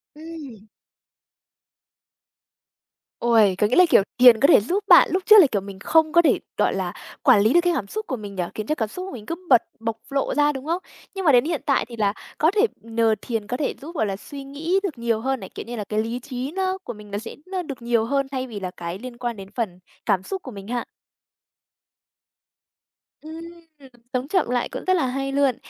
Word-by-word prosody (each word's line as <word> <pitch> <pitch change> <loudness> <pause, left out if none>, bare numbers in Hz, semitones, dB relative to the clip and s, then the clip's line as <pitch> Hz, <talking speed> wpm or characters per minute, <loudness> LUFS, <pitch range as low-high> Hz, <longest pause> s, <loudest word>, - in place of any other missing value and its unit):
Ừm. 300 -9 -10 2.5
Ôi, 225 -5 +4
có 210 - +3
nghĩa 235 - 0
là, 365 - +7
kiểu, - - +6 0.2
thiền 245 -3 +8
có 280 - +5
thể - - +7
giúp 370 - -1
bạn 350 - +8
lúc 370 0 0
trước 430 - +8
là, 325 - +7
kiểu, 200 -4 0
mình 195 -1 -10
không 315 +7 +3
có 340 - +7
thể, 335 - +3 0.2
gọi - - +2
là, - - -3 0.3
quản 255 -8 +6
lý 220 +5 +3
được 345 - +6
cái 350 -1 +2
cảm 200 - -2
xúc 435 - -5
của 260 - -2
mình 205 -4 -8
nhỉ, 180 - -1
khiến 215 0 -5
cho 305 - 0
cảm 220 -7 -2
xúc 365 - -6
của - - -7
mình 215 -4 -9
cứ 335 - -3
bật 245 -3 +7 0.2
bộc 225 0 -3
lộ 275 0 -1
ra, 295 0 +3
đúng 265 0 -7
không? 340 +4 -1 0.3
Nhưng 385 -1 -4
mà 300 - +6
đến 245 -1 +5
hiện 320 -4 -2
tại 280 -2 +2
thì 235 - -10
là 205 -2 +1 0.2
có 315 +3 +3
thể 425 +2 +3 0.2
nhờ 225 0 +1
thiền 225 -4 -4
có 250 - -2
thể 290 - -1
giúp, 325 +5 -9
gọi 220 - +1
là, 195 -2 -2
suy 275 +7 -9
nghĩ 310 +7 -1
được 325 -10 -3
nhiều 230 -1 0
hơn 265 +1 -1
này, - - -9
kiểu - - -6
như 240 - -6
là, 215 - -4
cái 215 0 0
lý 230 +2 -4
trí 255 +1 -5
nó 375 +1 -1
của - - -6
mình 210 -2 -13
nó 200 - -2
sẽ 225 - -7 0.3
được 275 -5 -7
nhiều 235 -1 +1
hơn 275 +2 0
thay 260 -1 -3
vì 215 -4 -7
là 185 -2 -5
cái 170 +2 -5
liên 250 -1 -9
quan 240 -3 -4
đến 195 0 -9
phần 200 -7 -3 0.3
cảm 195 -4 +1
xúc 385 - -5
của 260 - -8
mình 200 -2 -10
ha. 240 +1 -3 2.4
Ừm, 315 +1 -9 0.7
sống 255 +1 -1
chậm 350 -5 +1
lại 245 -1 0
cũng - - -6
rất 370 - +4
là 325 -8 +1
hay 275 +2 -3
luôn. 275 -2 +2
250 Hz, 235 wpm, -23 LUFS, 220-310 Hz, 2.5 s, thiền